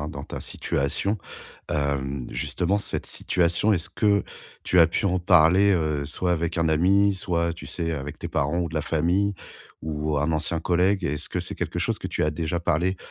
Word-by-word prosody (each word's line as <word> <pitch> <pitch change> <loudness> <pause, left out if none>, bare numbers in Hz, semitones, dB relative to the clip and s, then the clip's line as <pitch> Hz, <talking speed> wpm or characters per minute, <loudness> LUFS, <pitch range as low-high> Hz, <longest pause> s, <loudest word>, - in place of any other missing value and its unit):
hein, 75 - -4
dans 70 -2 -7
ta - - -7
situation. 85 +10 -1 0.5
Hem, 70 -3 -2
justement 85 +10 -1
cette - - -1
situation, 90 +4 +1
est-ce 85 0 -2
que 100 +1 +2 0.4
tu 90 - +4
as 80 - +8
pu 85 - -2
en 95 -1 +2
parler, 90 +4 +5
heu, 75 -4 0
soit 90 +4 -1
avec 85 -1 -1
un 80 -1 +2
ami, 100 +6 +4
soit 85 -3 -1
tu 85 - -10
sais, 85 -2 -2
avec 70 -1 -5
tes - - -5
parents 75 +5 0
ou 85 - -1
de 80 - -10
la 80 - +1
famille 90 +7 +1 0.5
ou 75 -1 -2
un 75 +3 +1
ancien 80 +1 0
collègue? 90 +3 +1
Est-ce 75 -1 -2
que - - -3
c'est - - -3
quelque - - -4
chose - - 0
que - - -5
tu - - -1
as 75 - +1
déjà 80 +2 -2
parlé 90 +3 0
85 Hz, 200 wpm, -25 LUFS, 75-90 Hz, 0.5 s, as